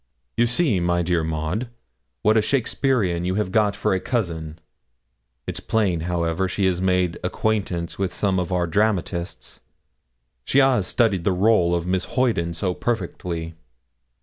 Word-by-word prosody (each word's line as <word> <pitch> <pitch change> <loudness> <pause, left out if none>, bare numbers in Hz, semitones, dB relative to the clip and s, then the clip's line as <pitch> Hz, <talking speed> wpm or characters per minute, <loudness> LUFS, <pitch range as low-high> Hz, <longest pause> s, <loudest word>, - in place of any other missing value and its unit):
'You 120 +1 +3
see, 120 - +1
my 85 0 +1
dear 85 -1 +1
Maud, 80 +9 -2 0.5
what 110 +1 +4
a 110 - +5
Shakespearean 115 -8 0
you 90 +1 -1
have 105 -3 -1
got 105 -2 +2
for - - 0
a 95 - +1
cousin. 85 -10 -3 0.9
It's - - -4
plain, 100 -7 0
however, 85 +1 0
she 95 +2 -1
has 90 -1 +1
made 90 -2 +1
acquaintance 90 -3 -2
with 95 -2 0
some 95 0 0
of 90 0 -3
our 90 -1 +1
dramatists: 90 -2 -1 0.8
she 130 - 0
has 130 -8 +4
studied 105 -7 +1
the 95 0 +1
rôle 90 -3 +3
of 85 -1 -2
Miss 90 0 0
Hoyden 110 -10 0
so 90 +2 -1
perfectly.' 85 -7 -3
95 Hz, 150 wpm, -23 LUFS, 85-110 Hz, 0.9 s, a